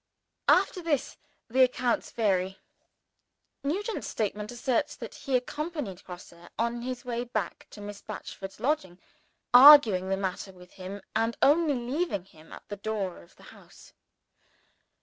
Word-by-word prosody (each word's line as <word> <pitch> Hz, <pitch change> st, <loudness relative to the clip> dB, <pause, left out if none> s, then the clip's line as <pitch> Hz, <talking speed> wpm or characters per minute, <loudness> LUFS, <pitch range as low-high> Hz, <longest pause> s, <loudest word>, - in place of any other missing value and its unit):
After 365 Hz, -, +4 dB
this, 310 Hz, -6 st, -1 dB, 0.3 s
the 255 Hz, +3 st, +2 dB
accounts 250 Hz, -1 st, 0 dB
vary. 190 Hz, -4 st, 0 dB, 1.1 s
Nugent's 400 Hz, -, -2 dB
statement 210 Hz, 0 st, -3 dB
asserts 245 Hz, +4 st, -1 dB
that -, -, -8 dB
he 270 Hz, -, -3 dB
accompanied 290 Hz, -, -5 dB
Grosse 180 Hz, -1 st, -10 dB, 0.2 s
on 235 Hz, +1 st, -1 dB
his 250 Hz, +1 st, -5 dB
way 240 Hz, -1 st, -2 dB
back 215 Hz, -7 st, -4 dB
to 205 Hz, -, -12 dB
Miss 205 Hz, 0 st, -8 dB
Batchford's 195 Hz, 0 st, -8 dB
lodging, 215 Hz, -, -1 dB, 0.6 s
arguing 245 Hz, -9 st, +9 dB
the 195 Hz, -, +1 dB
matter 190 Hz, 0 st, -4 dB
with 180 Hz, 0 st, -16 dB
him, 195 Hz, +1 st, -8 dB
and 225 Hz, +1 st, 0 dB
only 300 Hz, 0 st, +4 dB
leaving 245 Hz, -, -2 dB
him 160 Hz, -4 st, -19 dB
at -, -, -12 dB
the 205 Hz, -, -6 dB
door 200 Hz, -, -3 dB
of 85 Hz, -, -20 dB
the -, -, -19 dB
house. -, -, -17 dB
230 Hz, 140 wpm, -28 LUFS, 195-265 Hz, 1.1 s, arguing